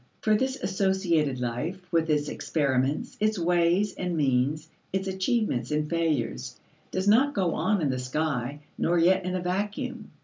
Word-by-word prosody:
For 215 - +3
this 260 +4 0
associated 185 -8 +1
life, 125 +10 -3
with 165 -2 +1
its 150 -1 +2
experiments, 140 -3 -1
its 215 0 +1
ways 175 +3 +2
and 180 -2 -3
means, 140 +2 +1 0.2
its 190 0 -1
achievements 190 - 0
and 150 0 0
failures, 145 -7 -1 0.3
does 190 +1 -2
not 260 +7 +4
go 180 -4 +1
on 205 -6 +1
in 140 - +1
the 130 - -2
sky 140 0 -2 0.2
nor 175 +1 +2
yet 185 +3 +4
in 185 0 -1
a 185 - -1
vacuum. 195 +4 -3
170 Hz, 160 wpm, -27 LUFS, 145-190 Hz, 0.3 s, not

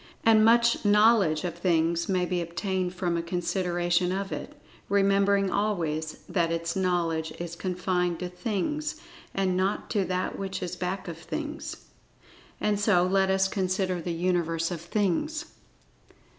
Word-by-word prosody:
And, 220 -1 +6
much 235 +1 +4
knowledge 205 -6 +4
of 175 -2 -2
Things 170 -1 +1
may 185 -2 +2
be 180 0 -1
obtained 180 +2 -2
from 175 -2 -1
a - - 0
consideration 175 0 0
of 195 +1 -3
it—remembering 200 0 0
always, 165 -7 -1
that 170 -3 0
its 170 0 -2
knowledge 170 -4 0
is 170 -1 -5
confined 180 -1 -1
to 180 - -4
Things, 225 - -3 0.4
and 190 -2 +1
not 190 +2 -1
to 205 -4 +2
That 185 0 -2
which 195 -1 -4
is 180 0 -4
back 185 +1 -3
of 165 -1 -6
Things. 300 - -6 0.7
And, 210 -1 +1
so 205 -4 +4
let 190 +1 +2
us 190 0 +3
consider 185 -2 -1
the 175 - -5
Universe 165 -1 0
of 170 -3 -4
Things. 210 - -1
185 Hz, 145 wpm, -27 LUFS, 170-200 Hz, 0.7 s, And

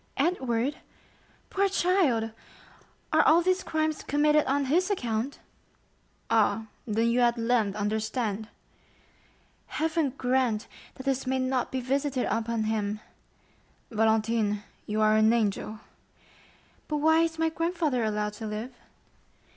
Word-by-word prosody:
"Edward? 270 -4 0 0.7
Poor 395 0 +2
child! 340 - +2 0.8
Are - - +6
all 335 +2 +5
these 370 +1 +2
crimes 315 -2 -1
committed 300 +1 +3
on 280 +1 +1
his 350 +8 +2
account?" 245 - -2 0.9
"Ah, 225 0 +2 0.2
then 225 +1 +1
you 240 - +2
at 240 0 +3
length 230 -3 +1
understand?" 215 +1 -2 1.2
"Heaven 315 -4 -1
grant 250 -4 +1 0.3
that 260 - -9
this 270 -1 -1
may 260 0 +1
not 255 -1 -1
be 260 - -2
visited 270 +1 0
upon 230 0 -1
him!" 215 -1 -1 0.9
"Valentine, 220 -1 +1 0.2
you 215 +1 -1
are 215 0 +4
an 215 +1 +5
angel!" 215 -1 -1 1.1
"But 300 - -1
why 320 +2 +4
is 330 -1 0
my 325 0 +2
grandfather 330 -6 -1
allowed 210 -1 -1
to 220 +1 -6
live?" 215 +4 -5
245 Hz, 125 wpm, -28 LUFS, 220-300 Hz, 1.2 s, Are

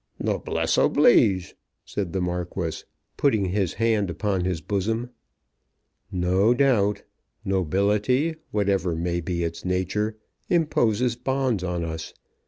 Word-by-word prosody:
"Noblesse - - 0
oblige," 95 -2 +4 0.3
said 95 -5 -3
the 95 - -1
Marquis, 90 -1 -3 0.3
putting 110 -9 +2
his 95 -1 0
hand 110 -3 +1
upon 95 0 -1
his 90 -3 -1
bosom. 110 +7 -2 1.0
"No 95 +5 +2
doubt. 105 -7 +2 0.4
Nobility, 100 - +1 0.2
whatever 95 -4 0
may 85 +1 -1
be 85 +1 -2
its 85 0 -4
nature, 95 +4 -1 0.3
imposes 125 - +2
bonds 130 -4 -1
on 90 -2 -2
us. 80 0 -6
100 Hz, 110 wpm, -25 LUFS, 90-110 Hz, 1.0 s, oblige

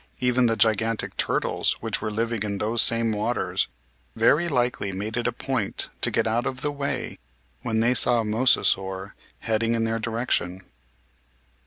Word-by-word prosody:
Even 125 0 +2
the 115 - +1
gigantic 110 +1 +1
turtles - - 0
which - - -2
were 110 - -2
living 115 +1 -2
in 105 -1 -2
those 110 +3 +1
same 115 -1 +3
waters 110 +3 -1 0.5
very 150 +9 +3
likely 120 -7 0
made 105 +4 -4
it 120 0 -1
a - - +1
point 120 -4 -2
to - - +6
get - - 0
out 115 +2 0
of 125 -1 -4
the 145 - -1
way 140 -1 -4 0.4
when 110 -1 0
they 120 +2 +3
saw 120 -1 +4
a - - -4
Mosasaur 100 -4 +1 0.3
headed 115 +1 0
in 115 - 0
their 115 0 -1
direction. 110 -5 -1
115 Hz, 165 wpm, -25 LUFS, 110-120 Hz, 0.5 s, to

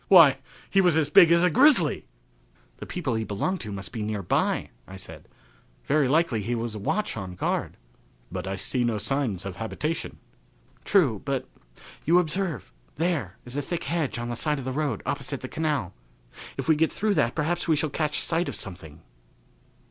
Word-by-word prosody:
"Why, 165 -8 +8 0.3
he 195 - +3
was 175 -4 +4
as 150 -2 +1
big 175 -4 +8
as 170 +1 +5
a 180 - +4
grizzly." 245 - +4 0.7
"The - - -8
people 155 -9 -2
he 110 0 -1
belonged 110 - -2
to 105 - -6
must 100 -1 -6
be 115 - -5
near 105 -1 -2
by," - - 0 0.2
I 95 - -10
said. 95 - -9 0.6
"Very 145 -1 +3
likely 150 -5 +2
he 120 +4 -2
was 115 -1 -3
a 105 - -5
watch 210 - -1
on 95 -4 -6
guard." - - -2 0.5
"But 90 +1 -4
I 95 - -2
see 120 +6 -1
no 115 -2 0
signs 115 -5 -1
of 95 -2 -6
a - - -13
habitation." 150 +8 -3 0.7
"True, 140 - +3
but 135 -2 -2 0.6
you 170 +3 +4
observe 165 - -1 0.2
there 145 - -1
is 125 +1 -8
a - - +1
thick 170 +4 -4
hedge 165 -7 -1
on 120 0 -4
the 120 - -2
side 150 +5 0
of 135 - -6
the 130 - -2
road 145 +1 -2
opposite 140 -1 -2
the 130 - -5
canal. 150 - -2 0.6
If - - -4
we 160 - +5
get 160 +1 +2
through 215 0 0
that 140 -9 +1
perhaps 170 +3 -1
we 160 - +4
shall 150 0 -1
catch 150 0 0
sight 170 +1 0
of - - -6
something." 85 -4 -8
140 Hz, 195 wpm, -26 LUFS, 110-165 Hz, 0.7 s, Why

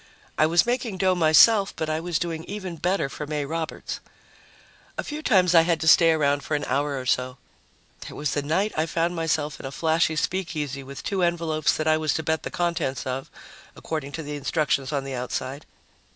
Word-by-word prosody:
I 155 - +4
was 170 +5 +4
making 240 -4 -1
dough 185 0 +3
myself, 180 +5 +5
but 160 - -3
I 155 0 -1
was 170 -1 -1
doing 165 -2 -3
even 190 -4 -6
better 180 -1 0
for 145 +2 -7
May 150 -1 -2
Roberts. 160 +2 -4 1.0
A - - -2
few 300 +1 -5
times 185 - +3
I 165 - +8
had 165 0 +1
to 160 - -2
stay 165 0 +7
around 145 -2 +2
for 155 - -1
an 145 - -2
hour 140 +1 -1
or 130 - -7
so. 125 +1 0 0.7
There - - -9
was 150 -2 -1
the 145 - 0
night 175 +9 0
I 155 +1 0
found 170 +1 0
myself 155 -2 -1
in - - -8
a - - -7
flashy 160 +1 +1
speakeasy 155 -5 -2
with 135 0 -9
two 195 -2 -1
envelopes 165 -3 +1
that 155 - -2
I 155 0 +4
was 155 -3 0
to 160 - -2
bet 160 0 0
the - - -5
contents 170 -6 -2
of, 130 +1 -4 0.5
according 155 -3 -5
to 160 - -4
the 150 0 -5
instructions 145 -1 0
on 140 -2 -1
the 135 0 -6
outside. 130 +3 -4
160 Hz, 210 wpm, -25 LUFS, 145-175 Hz, 1.0 s, I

